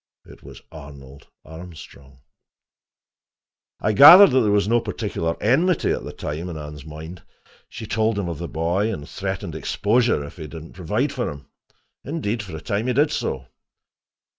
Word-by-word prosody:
It - - -16
was - - -13
Arnold 70 -3 -13 0.2
Armstrong. 80 -5 -13 1.6
I 110 - 0
gathered 165 - +10
that 130 - +4
there 110 -4 +2
was 100 0 +2
no 120 +2 +3
particular 85 -8 -3
enmity 155 - +2
at - - -2
that - - -9
time 75 +4 -5
in 85 - -6
Anne's 75 -1 -9
mind. 80 +3 -10 0.5
She 110 - -8
told 110 +1 0
him 100 -3 -2
of 85 -3 -5
the 85 - -5
boy, 85 +8 -1
and 75 -9 -7
threatened - - -5
exposure 115 -6 0
if 70 - -12
he 80 -3 -7
did 80 +1 -9
not 80 - -14
provide 105 - -2
for 125 -3 -2
him. 70 0 -10 0.6
Indeed, 125 -7 -3
for 95 -5 -9
a - - -10
time, 105 +3 -2
he 125 - +1
did 145 +4 +2
so. 65 -1 -3
90 Hz, 170 wpm, -22 LUFS, 75-115 Hz, 1.6 s, gathered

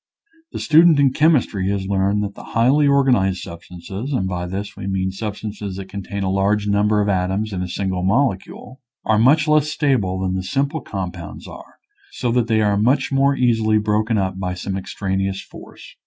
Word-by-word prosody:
The - - -6
stu 155 +1 +5
dent 165 -4 +5
in 135 -2 +3
chemistry 130 - +2
has 100 -1 -2
learned 100 +1 0
that 100 0 -4
the - - -11
highly 135 +6 +4
organized 125 -10 +2
substances 90 +8 -8
(and 95 -7 0
by 90 -1 -3
this 100 +3 -5
we 95 - -7
mean 95 -1 -1
substances 105 -1 -6
that 95 0 -8
contain 100 0 -5
a 95 - 0
large 100 +2 +1
number 105 +1 +2
of - - -2
atoms 95 +2 -1
in 90 - -3
a 90 - -3
single 95 0 -2
molecule), 120 +4 -1 0.2
are 110 -1 +2
much 150 +7 +4
less 150 -1 +3
stable 125 -12 0
than 95 -1 -1
the 95 - -2
simple 140 - -1
compounds 90 -4 -7
are, - - -12 0.4
so 120 -2 -2
that 120 -1 +1
they 110 -1 +2
are 105 -1 +2
much 125 +8 +2
more 135 +1 +3
easily 115 -4 +2
broken 110 +1 0
up 95 -1 -2
by 90 -1 -3
some 95 +2 -4
extraneous 95 0 -3
force. - - -13
100 Hz, 190 wpm, -20 LUFS, 95-125 Hz, 0.4 s, stu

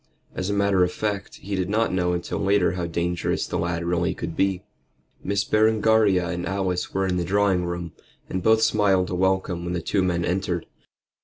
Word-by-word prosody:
As 95 +1 -3
a - - 0
matter 100 -2 +3
of 90 - +1
fact, 100 -1 -3
he 100 - -5
did 90 -1 -1
not 110 0 +1
know 90 -1 +1
until 85 0 -3
later 100 +1 +2
how 90 -1 -3
dangerous 85 +1 -1
the 90 - -3
lad 85 0 -2
really 85 +1 0
could 85 -1 -5
be. 95 -1 0 0.6
Miss 100 +1 0
Berengaria 110 -3 +3
and 85 -1 -3
Alice 95 -1 -2
were 95 0 0
in 90 -1 0
the 90 - 0
drawing 95 0 +2
room, 85 -1 -4 0.4
and 95 - -3
both 110 +3 +4
smiled 95 -5 +2
a - - -2
welcome 95 -1 0
when 85 0 -3
the - - -1
two 95 +4 0
men 85 -2 0
entered. 90 -1 -1
95 Hz, 200 wpm, -24 LUFS, 85-100 Hz, 0.6 s, both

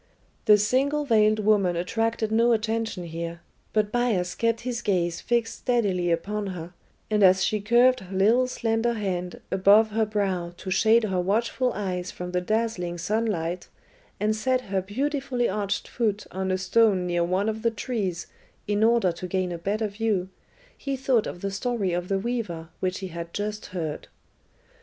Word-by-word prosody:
The 210 -1 +7
single 275 +8 +1
veiled 215 -4 +4
woman 205 -4 +2
attracted 225 +5 -1
no 230 +2 +4
attention 225 -3 -1
here, 170 0 -6 0.3
but 210 -1 +1
Bias 215 -8 0
kept 230 0 0
his 240 -1 -3
gaze 175 -5 0
fixed 235 -1 -1
steadily 200 -8 +1
upon 205 +5 -1
her, 175 -2 -7 0.4
and 210 -1 +2
as 190 0 +6
she 215 -1 0
curved 240 +4 +4
her 190 -1 -7
little 230 +6 +4
slender 230 -1 0
hand 180 -5 -3
above 200 +3 +5
her 220 0 +1
brow 190 -5 -1
to 190 - -6
shade 225 +4 +4
her 190 -4 0
watchful 230 +6 0
eyes 185 -3 -3
from 180 0 -6
the 180 0 0
dazzling 200 -4 -1
sunlight, 180 -3 -1 0.5
and 215 +1 +1
set 255 +3 +1
her 195 -5 -2
beautifully 260 +4 -1
arched 205 0 -2
foot 215 -3 -1
on 190 +1 -3
a 185 - +1
stone 190 0 +3
near 175 -1 +1
one 185 +4 0
of 220 0 -2
the 230 - +2
trees 205 -6 -3 0.4
in 205 +1 +1
order 230 -5 +4
to 175 +2 -7
gain 185 0 -1
a 170 - -5
better 210 +5 -1
view, 205 -3 -1 0.5
he 275 -1 -3
thought 255 -4 +1
of 175 - -7
the 200 - -2
story 200 -2 -1
of 175 +1 -2
the 195 - +1
weaver 195 -7 -3
which 185 +1 -2
he 190 - -5
had 170 0 -7
just 210 +1 -3
heard. 160 -5 -5
205 Hz, 170 wpm, -26 LUFS, 180-230 Hz, 0.5 s, The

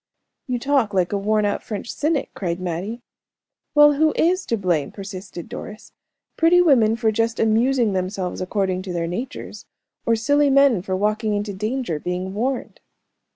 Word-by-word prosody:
"You 250 -1 -1
talk 250 -5 +1
like 180 0 +1
a - - +1
worn 210 +1 +1
out 205 - -1
French 215 +1 -5
cynic," 300 -2 -1
cried 175 -2 -3
Mattie. 185 +7 -4 0.7
"Well, 295 0 +7
who 310 +2 +2
is 365 +3 +1
to 230 - 0
blame?" 175 -7 0
persisted 195 -3 -8
Doris; 215 0 -9 0.4
"pretty 330 +2 +5
women 245 -10 +4
for 230 -1 +1
just 225 +1 -1
amusing 230 0 +2
themselves 185 -1 -3
according 185 -1 -1
to 185 -1 -6
their 170 -1 -1
natures? 185 +10 -6 0.4
or 230 - +4
silly 285 +6 +2
men 275 -7 +4
for 185 0 -3
walking 210 +2 0
into 205 0 -3
danger, 215 - -2
being 180 +3 -4
warned?" 250 +5 -3
215 Hz, 160 wpm, -22 LUFS, 185-255 Hz, 0.7 s, Well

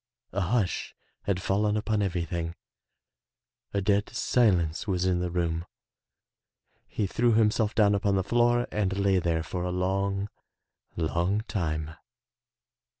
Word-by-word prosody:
A 100 - -1
hush 100 +1 -1 0.3
had 100 -2 0
fallen 105 +2 +1
upon 105 0 0
everything, 85 -3 -2 1.2
a 100 - 0
dead 100 +1 +1
silence 90 -7 +1
was 90 -2 0
in 90 -1 +2
the 90 0 -1
room. 85 -1 -1 1.2
He 105 - -2
threw 115 +4 +2
himself 110 -1 +2
down 105 -2 +4
upon 100 0 +1
the 95 - +1
floor 120 +3 +2
and 95 -2 0
lay 100 -1 +3
there 80 -2 0
for 90 +2 -4
a 90 - -1
long, 95 +2 -1 0.7
long 85 +6 0
time. 80 -8 -3
95 Hz, 130 wpm, -28 LUFS, 90-105 Hz, 1.2 s, down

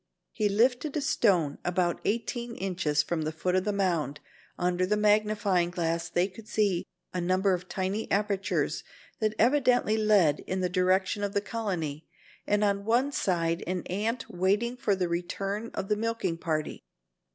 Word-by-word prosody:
He 210 -2 0
lifted 245 +8 +2
a - - +2
stone 180 - +2
about 175 -1 0
eighteen 235 +2 -2
inches 175 -6 0
from 165 +1 -2
the 155 0 -2
foot 180 +3 -2
of 185 0 +1
the 210 - +1
mound. 170 -8 0 0.4
Under 180 0 +1
the 210 +3 +1
magnifying 210 -4 +2
glass 170 -1 -2
they 175 +2 +2
could 210 +3 -13
see 200 -5 0 0.3
a 180 - -1
number 185 +2 +2
of 180 0 -4
tiny 195 +3 -2
apertures 200 -1 0 0.4
that 215 -1 0
evidently 245 -3 +3
led 205 -9 +4
in 185 - -1
the 180 -1 0
direction 185 +2 +1
of 200 -1 -2
the 200 - +2
colony, 180 -10 -3 0.4
and 205 0 +2
on 200 -1 +1
one 240 +6 +2
side 170 - 0
an 180 -1 -2
ant 220 +6 -2
waiting 205 +7 0
for 215 -5 +1
the 185 -2 0
return 195 +5 -3
of 195 - -3
the 210 - +2
milking 230 -5 -1
party. 155 -3 -2
195 Hz, 165 wpm, -28 LUFS, 175-215 Hz, 0.4 s, led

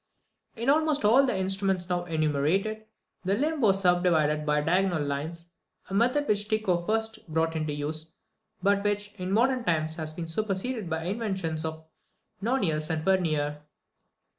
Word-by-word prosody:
In 235 +2 -4
almost 300 -3 +3
all 260 +6 +6
the 225 - 0
instruments 190 -1 0
now 175 -1 -1
enumerated, 165 +7 0 0.4
the 195 +1 +1
limb 300 +4 -1
was 195 -4 +4
subdivided 165 -5 +2
by 150 0 +2
diagonal 175 0 +1
lines, 160 +5 -4 0.4
a - - -4
method 250 +8 +2
which 205 0 +1
Tycho 215 -5 +1
first 220 +4 -2
brought 160 +1 0
into 155 -1 -1
use, 155 +2 -4 0.5
but 200 0 +3
which, 205 0 -1
in 185 +1 -3
modern 250 +4 +2
times, 160 -2 0
has 155 -1 -4
been 165 +1 -5
superseded 205 +4 -2
by 160 0 -2
the 175 - -2
inventions 190 -8 -2
of 160 0 -5 0.6
Nonius 180 -10 0
and 160 -1 -1
Vernier. 155 -6 +1
185 Hz, 155 wpm, -27 LUFS, 160-215 Hz, 0.6 s, all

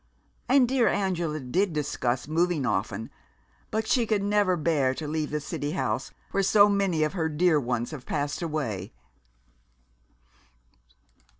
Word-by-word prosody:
And 260 -1 +5
dear 255 -1 +2
Angela 175 -6 0
did 170 +8 0
discuss 135 -4 -1
moving 165 -2 +1
often, 105 0 -2 0.6
but 220 0 -1
she 235 0 +2
could 210 -2 +1
never 205 -3 +2
bear 145 -5 +1
to 155 - -5
leave 155 0 -2
the 150 - -2
city 145 0 -4
house, - - -2 0.2
where 195 - +1
so 200 +1 +6
many 195 -6 +1
of 155 - -1
her 160 -4 -1
dear 160 0 +3
ones 120 -1 -2
have 140 -5 -9
passed 145 +2 -2
away." 125 - -3
155 Hz, 140 wpm, -27 LUFS, 145-195 Hz, 0.6 s, so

